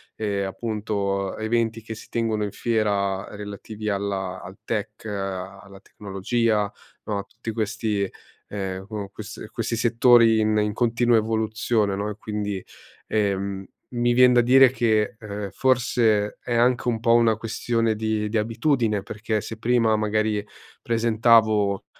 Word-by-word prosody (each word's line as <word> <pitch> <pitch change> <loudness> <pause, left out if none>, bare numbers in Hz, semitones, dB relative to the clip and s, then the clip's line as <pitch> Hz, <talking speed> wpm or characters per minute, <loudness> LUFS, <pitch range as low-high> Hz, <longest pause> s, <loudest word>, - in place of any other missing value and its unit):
e 100 -2 -2
appunto 100 -1 -2
eventi 115 0 -1
che 110 0 -7
si - - -12
tengono 110 -2 -1
in 100 - -3
fiera 100 -4 0
relativi 105 +1 -6
alla 100 -2 -2
al 95 +3 -11
tech, 110 -1 -4
alla 95 -1 -6
tecnologia, 105 +2 -1 0.3
no, 105 -1 -2
a 100 - -3
tutti 115 +2 -7
questi, 110 -2 -1 0.4
ehm, 95 -2 -5
q 110 - -14 0.2
questi 105 +1 -9
a - - -10
questi 115 0 -3
settori 115 -1 +5
in 110 0 +2
in 105 0 +1
continua 120 +1 +2
evoluzione, 110 -1 0
no, 100 +2 -2
e 105 - -5
quindi, 105 -3 -4 0.4
ehm, 100 -2 -1 0.3
mi 120 0 +2
vien 125 0 +6
da 120 - +6
dire 130 +1 +6
che, 110 -3 +1
ehm, 105 -1 -5
forse 115 -5 +2
è 125 - -3
anche 120 +1 +2
un 115 -2 +1
po' 115 +1 +3
una 115 -1 +4
questione 115 0 -1
di 110 0 -1
di 110 - 0
abitudine. 115 -1 0
Perché 105 +1 -2
se 110 - -7
prima 115 -1 +2
magari 110 0 0 0.4
presentavo 110 -3 +3
110 Hz, 145 wpm, -24 LUFS, 100-115 Hz, 0.4 s, vien